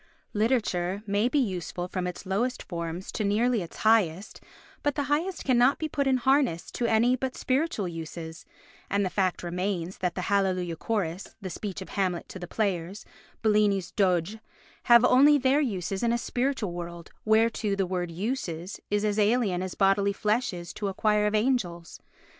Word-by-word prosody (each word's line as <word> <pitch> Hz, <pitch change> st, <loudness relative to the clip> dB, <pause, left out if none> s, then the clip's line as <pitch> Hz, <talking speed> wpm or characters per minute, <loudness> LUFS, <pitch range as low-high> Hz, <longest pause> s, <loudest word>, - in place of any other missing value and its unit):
Literature 205 Hz, -4 st, 0 dB
may 205 Hz, +3 st, +1 dB
be 295 Hz, -, 0 dB
useful 180 Hz, -, -2 dB
from 180 Hz, 0 st, -3 dB
its 180 Hz, +2 st, -6 dB
lowest 215 Hz, +7 st, -1 dB
forms 170 Hz, 0 st, -5 dB
to 215 Hz, -, -2 dB
nearly 220 Hz, +3 st, +2 dB
its 170 Hz, -, -8 dB
highest, 210 Hz, -4 st, +2 dB, 0.4 s
but 290 Hz, -2 st, 0 dB
the 285 Hz, -, 0 dB
highest 315 Hz, +6 st, -1 dB
cannot 255 Hz, +1 st, +4 dB
be 315 Hz, -, -2 dB
put 285 Hz, -2 st, -1 dB
in 260 Hz, -1 st, +3 dB
harness 260 Hz, -, +1 dB
to 240 Hz, -, -1 dB
any 235 Hz, +3 st, +3 dB
but 255 Hz, 0 st, -4 dB
spiritual 260 Hz, -, 0 dB
uses; 165 Hz, 0 st, -7 dB, 0.5 s
and 200 Hz, 0 st, +1 dB
the 185 Hz, -, -2 dB
fact 185 Hz, -3 st, 0 dB
remains 180 Hz, 0 st, -3 dB
that 180 Hz, -2 st, -1 dB
the 180 Hz, -, -2 dB
"Hallelujah 185 Hz, -3 st, 0 dB
Chorus," 190 Hz, -2 st, -3 dB
the 190 Hz, -2 st, -6 dB
speech 195 Hz, +1 st, -5 dB
of -, -, -15 dB
Hamlet 185 Hz, -3 st, -1 dB
to 190 Hz, -, -8 dB
the 175 Hz, -, -7 dB
players, 190 Hz, -1 st, -2 dB, 0.4 s
Bellini's 210 Hz, -4 st, +2 dB
"Doge" 185 Hz, +1 st, +1 dB, 0.5 s
have 235 Hz, 0 st, +7 dB
their 250 Hz, -, +4 dB
only 280 Hz, +4 st, +7 dB
uses 250 Hz, -, 0 dB
in 235 Hz, -, +2 dB
a 235 Hz, -, +2 dB
spiritual 245 Hz, -4 st, -1 dB
world 170 Hz, -1 st, -7 dB
whereto 220 Hz, -1 st, +2 dB
the 195 Hz, -1 st, 0 dB
word 180 Hz, -1 st, -2 dB
"uses" 180 Hz, -2 st, -4 dB
is 205 Hz, +1 st, +1 dB
as 210 Hz, 0 st, 0 dB
alien 210 Hz, -4 st, +2 dB
as 185 Hz, -1 st, -4 dB
bodily 200 Hz, 0 st, +3 dB
flesh 215 Hz, +4 st, 0 dB
is 175 Hz, -1 st, -7 dB
to 205 Hz, -, -3 dB
a 195 Hz, -, -4 dB
choir 210 Hz, -1 st, +2 dB
of 210 Hz, -, 0 dB
angels. 210 Hz, -8 st, -1 dB
200 Hz, 175 wpm, -27 LUFS, 180-235 Hz, 0.5 s, have